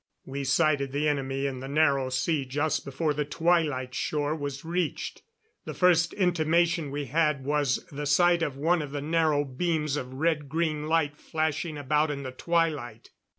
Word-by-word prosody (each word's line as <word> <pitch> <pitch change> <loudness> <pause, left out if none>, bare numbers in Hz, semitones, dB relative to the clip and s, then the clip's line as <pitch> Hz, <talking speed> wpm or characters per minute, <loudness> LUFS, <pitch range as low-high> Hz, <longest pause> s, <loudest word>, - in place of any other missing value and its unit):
We 140 +1 -4
sighted 140 -1 +2
the 145 +2 +1
enemy 135 -1 -1
in 135 -2 -3
the 135 - -7
Narrow 140 -2 +2
Sea 135 +3 0
just 145 +4 -1
before 150 +3 -1
the 150 +1 -1
Twilight 150 -4 0
shore 150 +2 -1
was 145 -1 -5
reached. 170 -1 -2 0.4
The - - -6
first 170 -2 +3
intimation 170 -3 +1
we 145 +1 -3
had 150 -1 +1
was 145 -2 0
the 145 +1 -4
sight 175 +4 +4
of 145 -5 -2
one 165 +4 +2
of 145 - -5
the 145 0 -4
narrow 155 -2 +2
beams 150 +1 -1
of 130 -1 -6
red 150 -1 0
green 155 -1 -1
light 155 -2 +1
flashing 155 0 -2
about 150 +2 +1
in 140 -1 -4
the 130 - -5
twilight. 145 -7 -1
150 Hz, 170 wpm, -27 LUFS, 140-165 Hz, 0.4 s, sight